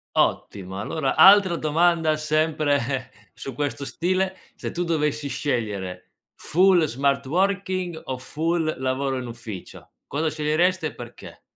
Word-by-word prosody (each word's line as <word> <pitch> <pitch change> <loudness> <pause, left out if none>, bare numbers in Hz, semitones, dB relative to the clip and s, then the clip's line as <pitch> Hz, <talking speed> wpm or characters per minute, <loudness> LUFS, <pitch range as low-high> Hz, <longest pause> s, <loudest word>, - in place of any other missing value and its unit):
Ottimo, 95 -1 0
allora 135 +5 -1
altra 190 -2 +7
domanda 160 0 +2
sempre 150 -4 0 0.2
su 135 - -7
questo 145 0 -3
stile: 185 +4 -1 0.2
se - - -5
tu 175 - -2
dovessi 150 -3 -1
scegliere 100 -11 -3 0.2
full 180 0 +3
smart 140 0 0
working 185 0 0
o 130 -1 -3
full 160 +4 -1
lavoro 130 0 -1
in 125 - -6
ufficio 115 -5 -9 0.2
cosa 155 +2 -1
sceglieresti 155 +3 +1
e - - -8
perché? 120 -1 -11
150 Hz, 125 wpm, -24 LUFS, 130-170 Hz, 0.2 s, altra